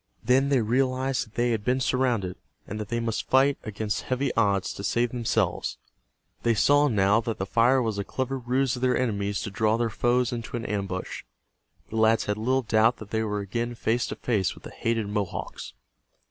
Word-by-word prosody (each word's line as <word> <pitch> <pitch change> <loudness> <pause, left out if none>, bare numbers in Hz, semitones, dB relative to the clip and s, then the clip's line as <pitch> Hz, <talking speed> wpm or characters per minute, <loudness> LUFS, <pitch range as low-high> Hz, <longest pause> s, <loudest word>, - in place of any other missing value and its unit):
Then 135 +2 +3
they 135 -3 +3
realized 130 +2 0
that 110 - -22
they 120 0 +1
had 110 -3 -1
been 125 +4 +1
surrounded, 125 -8 0 0.3
and 105 - -6
that 105 - -4
they 115 0 -1
must 115 -1 -3
fight 135 +2 +4
against 110 -1 -3
heavy 130 +1 -1
odds 100 -4 +1
to 100 - -8
save 120 +3 +1
themselves. 120 -3 -1 0.6
They 115 -1 +2
saw 145 +6 +4
now 105 -2 +3
that 115 -1 -3
the 95 - -2
fire 120 +5 +3
was 110 -3 -2
a - - -1
clever 130 +5 -3
ruse 130 +1 0
of 125 - -7
their 130 -1 +2
enemies 100 -5 -1
to 100 - -5
draw 110 +2 +2
their 115 -1 0
foes 120 +2 +1
into 120 0 -4
an 115 - -5
ambush. 100 -3 -3 0.7
The 110 - -3
lads 110 +1 +3
had 105 0 -2
little 130 +4 +1
doubt 115 +2 +3
that 105 -2 -11
they 110 - 0
were 105 -2 -2
again 115 +4 -3
face 115 +1 0
to - - -4
face 100 -8 0
with - - -16
the - - -9
hated 115 -2 -1
Mohawks. 100 - -4
115 Hz, 200 wpm, -26 LUFS, 105-125 Hz, 0.7 s, fight